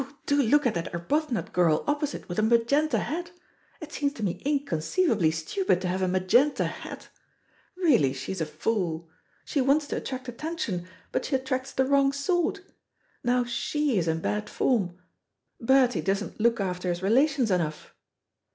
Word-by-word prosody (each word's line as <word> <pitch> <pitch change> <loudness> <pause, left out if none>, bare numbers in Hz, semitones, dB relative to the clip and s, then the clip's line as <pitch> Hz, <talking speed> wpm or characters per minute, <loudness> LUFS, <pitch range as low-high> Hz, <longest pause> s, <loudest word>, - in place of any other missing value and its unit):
do 285 0 +3
look 285 +4 +3
at 240 - +2
that 170 -1 -3
Arbuthnot 270 - -1
girl 165 -4 +3
opposite 295 0 -2
with 175 +3 -3
a - - +4
magenta 235 +7 +3
hat. 345 +3 -3 0.5
It 310 -2 -9
seems 285 -1 0
to 225 - -7
me 180 -1 -2
inconceivably 265 - +1
stupid 175 - 0
to 185 - -2
have 185 +1 -1
a 185 - +2
magenta 190 +11 +3
hat. - - -7 0.7
Really 280 - +4
she 135 +6 -5
is 190 -3 -4
a 160 - -1
fool. 165 0 -2 0.3
She 285 - 0
wants 280 +3 +3
to - - -2
attract 260 -1 -5
attention, 245 - -4 0.2
but - - -1
she 275 - 0
attracts 260 0 -2
the 265 - +1
wrong 275 0 +3
sort. 350 +7 0 0.6
Now 245 +1 +2
she 250 +1 0
is 170 - -1
in 160 0 0
bad 210 +3 -2
form. 195 -9 0 0.6
Bertie 250 -6 +3
doesn't 195 +7 -2
look 235 0 +3
after 180 -2 -2
his 175 +1 -2
relations 255 +2 +3
enough." 160 -4 -2
235 Hz, 165 wpm, -27 LUFS, 180-285 Hz, 0.7 s, a